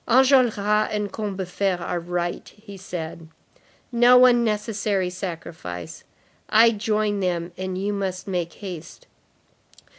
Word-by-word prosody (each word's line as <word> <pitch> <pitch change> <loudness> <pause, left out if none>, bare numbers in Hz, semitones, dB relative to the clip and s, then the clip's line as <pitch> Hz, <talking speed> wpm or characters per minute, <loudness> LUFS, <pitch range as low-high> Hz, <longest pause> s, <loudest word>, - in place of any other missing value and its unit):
"Enjolras 255 -1 +5 0.3
and 210 -2 -2
Combeferre 195 -2 -2
are 175 0 -3
right," 175 0 -4 0.2
said 175 -4 -6
he; 165 - -14 0.7
"no 250 +1 +7
unnecessary 210 -5 +1
sacrifice. 165 - -7 0.5
I 230 +2 +6
join 215 -1 0
them, 175 -2 -1
and 185 0 -4
you 200 +2 -1
must 190 -2 -3
make 175 -3 -2
haste. 185 - -9
195 Hz, 110 wpm, -23 LUFS, 175-215 Hz, 0.7 s, no